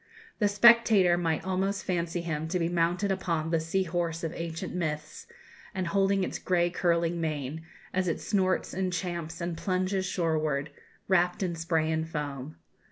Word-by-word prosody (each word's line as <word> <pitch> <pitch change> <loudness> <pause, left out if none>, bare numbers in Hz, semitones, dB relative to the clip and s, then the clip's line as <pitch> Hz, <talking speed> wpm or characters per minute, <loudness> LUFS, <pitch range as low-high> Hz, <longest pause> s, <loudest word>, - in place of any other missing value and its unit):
The 210 - +4
spectator 205 -4 +6
might 165 -2 -1
almost 190 +1 -1
fancy 175 -1 -1
him 160 -2 -3
to 180 +3 -1
be 165 -2 +1
mounted 175 +3 +1
upon 165 -4 -1
the 165 - +3
sea 165 +4 0
horse 170 -1 -2
of 165 0 -2
ancient 170 +2 -5
myths, 155 -3 -4 0.5
and 185 -1 -1
holding 195 +2 +2
its - - -3
grey 175 -1 +1
curling 170 -1 +1
mane, 155 -1 -3 0.3
as 185 0 +1
it 165 - 0
snorts 185 -2 0
and 185 0 -1
champs 170 -2 -4
and 170 0 -2
plunges 185 +2 -1
shoreward, 155 -5 0 0.4
wrapped 180 0 +2
in 180 -2 -1
spray 165 -1 0
and 160 0 -1
foam. 145 -2 -5
170 Hz, 165 wpm, -29 LUFS, 160-185 Hz, 0.5 s, spectator